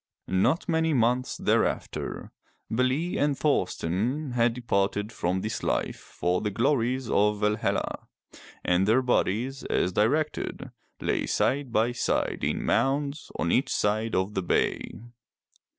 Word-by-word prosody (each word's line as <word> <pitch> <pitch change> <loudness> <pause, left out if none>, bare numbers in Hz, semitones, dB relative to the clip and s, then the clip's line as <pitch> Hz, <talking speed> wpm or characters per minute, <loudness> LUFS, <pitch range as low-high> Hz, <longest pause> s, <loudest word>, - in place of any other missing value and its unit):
*' - - -49 0.2
Not 165 - 0
many 160 -2 +2
months 125 +1 +1
thereafter, - - -1 0.4
Bele 130 +9 0
and 145 -2 +1
Thorsten 125 - 0
had 120 -1 +2
departed 105 -3 0
from 95 -3 -1
this 110 +3 -3
life - - -1
for 90 +1 -2
the 105 - -1
glories 125 +3 +1
of 105 -1 +2
Valhalla, 105 0 -1 0.6
and 90 +2 +2
their 120 +4 +4
bodies, 125 +2 0
as 90 - +1
directed, 145 +11 0 0.3
lay - - 0
side 135 -2 0
by 115 +1 +2
side 120 - -1
in - - -1
mounds 140 +4 0
on 85 - 0
each 130 - +2
side 110 +2 0
of 95 +3 0
the 95 - -1
bay. 90 - +1
120 Hz, 135 wpm, -27 LUFS, 105-135 Hz, 0.6 s, their